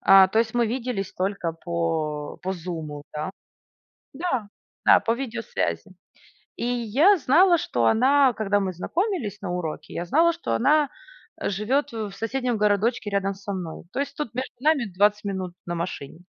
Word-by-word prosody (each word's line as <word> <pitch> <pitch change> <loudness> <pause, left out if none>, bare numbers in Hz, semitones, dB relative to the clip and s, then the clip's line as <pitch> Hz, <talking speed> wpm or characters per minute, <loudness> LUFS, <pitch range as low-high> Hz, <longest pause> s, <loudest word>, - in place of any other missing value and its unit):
А, 195 -1 +7
то 220 - +1
есть, 225 0 +1
мы 240 -1 +3
виделись 230 -4 -3
только 185 -3 -2
по 165 -3 -2
по 190 +1 -1
зуму, 160 -5 -6
да. 150 +4 -3 0.8
Да. 265 - -2 0.4
Да, - - +8
по 230 - -1
видеосвязи. 235 -2 -3 0.6
И - - -3
я 245 - +3
знала, 340 +6 +5
что 120 - 0
она, 265 - +4
когда 205 -2 +1
мы 190 -2 -2
знакомились 280 - -2
на 190 -3 -3
уроке, 175 -3 -4
я 175 - -3
знала, 330 - +4
что 335 - -3
она 290 +3 +3 0.5
живёт 245 +9 0
в 215 -3 -4
соседнем 245 +3 -2
городочке 210 +2 +1
рядом 200 -1 0
со 200 +1 -6
мной. 175 -4 -6
То - - -4
есть, 280 0 -2
тут 295 -7 -4
между 255 +2 -4
нами 300 -4 +3
20 205 +3 +2
минут 190 -3 -3
на 175 0 -3
машине. 165 -3 -5
210 Hz, 160 wpm, -25 LUFS, 180-260 Hz, 0.8 s, Да